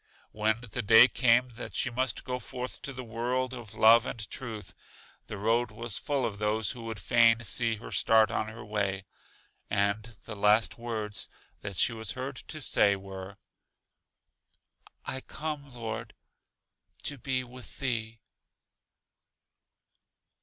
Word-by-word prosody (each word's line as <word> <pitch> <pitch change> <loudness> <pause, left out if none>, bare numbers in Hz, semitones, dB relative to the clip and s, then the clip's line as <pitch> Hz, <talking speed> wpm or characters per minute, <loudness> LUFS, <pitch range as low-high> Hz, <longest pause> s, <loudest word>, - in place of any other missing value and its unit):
When 110 +1 +1
the 125 -5 -4
day 110 +4 +8
came 125 0 +3
that 120 +1 -8
she 125 - +2
must 130 -1 -1
go 125 -1 -3
forth 125 +1 -6
to 140 - -5
the 130 -1 -7
world 125 +3 -1
of 115 -4 -8
love 115 +2 +7
and 110 -3 -5
truth, 110 -7 -6 0.5
the 105 - -6
road 115 +3 +2
was 115 0 -5
full 140 -3 0
of 105 -3 -3
those 105 -1 +1
who 120 - -8
would 110 -2 -5
fain 115 +2 +5
see 115 0 0
her 110 - -10
start 110 -1 +4
on 110 - -1
her 110 +1 -9
way; 100 -2 -1 0.6
and 105 +2 0
the 115 - -7
last 105 +3 +3
words 110 -3 -4 0.3
that 100 -3 -6
she 115 - +4
was 110 -4 -3
heard 130 +1 -5
to 155 - -7
say 100 -5 +4
were: 95 0 -8 1.7
I 130 - -3
come, 150 -2 -5
Lord, 115 -3 -5 0.9
to 145 -2 -3
be 130 +1 0
with 125 0 -11
Thee. 115 -4 -2
115 Hz, 145 wpm, -29 LUFS, 105-125 Hz, 1.7 s, day